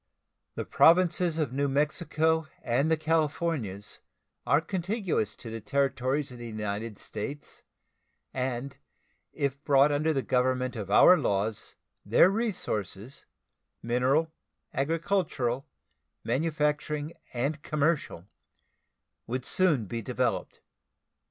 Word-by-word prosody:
The - - -3
Provinces 175 -1 +4
of 150 -6 -1
New 140 +1 +1
Mexico 155 +2 +1 0.2
and 130 +6 +1
the 160 - +3
Californias 155 - -1 0.5
are 145 - +5
contiguous 185 - -2
to 115 - -9
the 115 0 -5
territories 140 +2 0
of 125 - -10
the 120 - -7
United 105 0 -4
States, 140 +7 -7 0.7
and 130 +1 -3 0.5
if 140 0 -3
brought 140 0 +5
under 150 +2 +1
the 135 -4 0
government 130 0 0
of 105 -4 -5
our 145 - +8
laws 105 -4 -1 0.3
their 185 - +5
resources 135 - -3 0.6
mineral, 130 +7 +1 0.4
agricultural, 150 -4 -1 0.6
manufacturing, 150 +2 -1 0.2
and 140 +5 -2
commercial 150 - -1 1.0
would 125 +2 -3
soon 160 - +3
be 115 +4 -4
developed. - - -2
140 Hz, 105 wpm, -28 LUFS, 120-160 Hz, 1.0 s, our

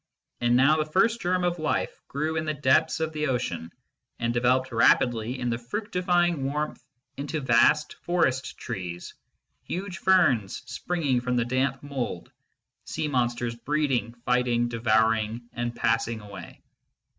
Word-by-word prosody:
And 120 0 +2
now 140 +5 +5
the 155 0 -2
first 230 +6 +3
germ 180 +1 +1
of 175 -1 0
life 155 -1 -2
grew 155 +3 -2
in 155 - 0
the 155 -1 -1
depths 145 +4 +2
of 160 0 -2
the 155 0 -1
ocean, 85 -10 -2 0.5
and 115 0 -1
developed 125 +2 +2
rapidly 120 +1 +3
in 125 -1 -1
the 115 - -2
fructifying 175 - 0
warmth 150 +3 -3 0.3
into 145 +3 -3
vast 145 +3 +3
forest 135 -7 0
trees, 90 -7 -6 0.5
huge 185 0 -5
ferns 170 - +3
springing 145 -8 -1
from 125 0 -1
the 120 -1 +1
damp 130 +2 -1
mould, 130 -11 -4 0.5
sea 155 - -3
monsters 120 -3 0
breeding, 130 -1 -1
fighting, 120 -1 +2
devouring, 110 0 +1
and 120 0 -3
passing 115 0 0
away. 100 -4 -11
130 Hz, 140 wpm, -26 LUFS, 120-155 Hz, 0.5 s, now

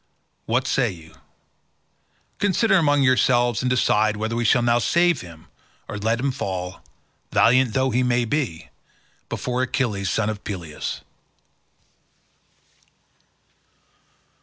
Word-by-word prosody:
What 125 +3 +1
say 125 -2 +1
you? 80 -4 -12 1.3
Consider 205 +2 +2
among 145 -4 +3
yourselves 120 -2 +3
and 125 - 0
decide 110 -4 +2
whether 110 +2 -2
we 120 - -1
shall 120 +2 +3
now 120 0 +3
save 170 +3 +2
him 80 -2 -13 0.4
or 105 - -6
let 115 +3 0
him 135 +2 0
fall, 95 -7 -5 0.5
valiant 125 0 +4
though 130 0 +1
he 125 +2 +1 0.2
be, 115 - -3 0.6
before 125 0 -2
Achilles, 115 -7 -1
son 110 +2 0
of 110 -1 -4
Peleus." 85 -7 -5
120 Hz, 110 wpm, -22 LUFS, 105-130 Hz, 1.3 s, valiant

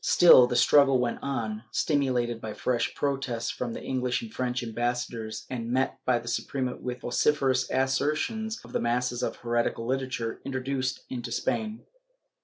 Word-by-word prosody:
Still 130 -8 +8
the 125 - -2
struggle 135 0 +5
went 120 -1 -1
on, 115 -6 -3
stimulated 125 -3 0
by 110 - -5
fresh 125 -2 -1
protests 135 -5 -1
from 120 -2 -4
the - - -6
EngHsh 125 -1 -1
and 110 - -9
French 125 -1 -2
ambassadors 120 -1 -3
and 120 -2 -4
met 130 +1 0
by 125 -1 +4
the 120 0 -8
Suprema 130 +1 -2
with 125 0 -5
vociferous 130 0 +1
assertions 155 +12 0
of 120 - -13
the - - 0
masses 120 +1 0
of - - -2
heretical 120 -1 -1
literature 130 -3 -2
introduced 130 -1 -2
into 120 -2 -4
Spain. 220 - -2
125 Hz, 155 wpm, -27 LUFS, 120-135 Hz, -, Still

